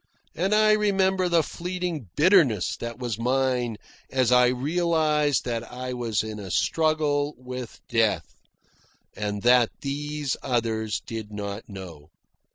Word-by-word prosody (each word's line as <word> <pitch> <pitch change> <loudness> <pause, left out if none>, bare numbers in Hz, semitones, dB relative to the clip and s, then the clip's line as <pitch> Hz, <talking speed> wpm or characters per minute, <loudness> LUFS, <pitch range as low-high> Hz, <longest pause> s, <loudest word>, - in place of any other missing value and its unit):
And 190 +5 +1
I 215 0 +5
remember 190 -3 +2
the 170 -2 +3
fleeting 175 - -4
bitterness 150 - +4
that 115 -1 -6
was 120 -4 -4
mine 125 -2 0 0.3
as 130 -2 +1
I 125 0 +6
realised 150 +2 +1
that 115 -2 -2
I 125 +1 -5
was 115 -4 -1
in 110 -1 -6
a 100 -2 -7
struggle 150 - +1
with 125 -1 -7
death, 115 -4 +1 0.8
and 105 -1 -3
that 120 -1 +5
these 145 0 -2
others 110 -4 -1
did 110 -2 -6
not 100 +1 -6
know. 85 -7 -10
125 Hz, 130 wpm, -25 LUFS, 115-155 Hz, 0.8 s, I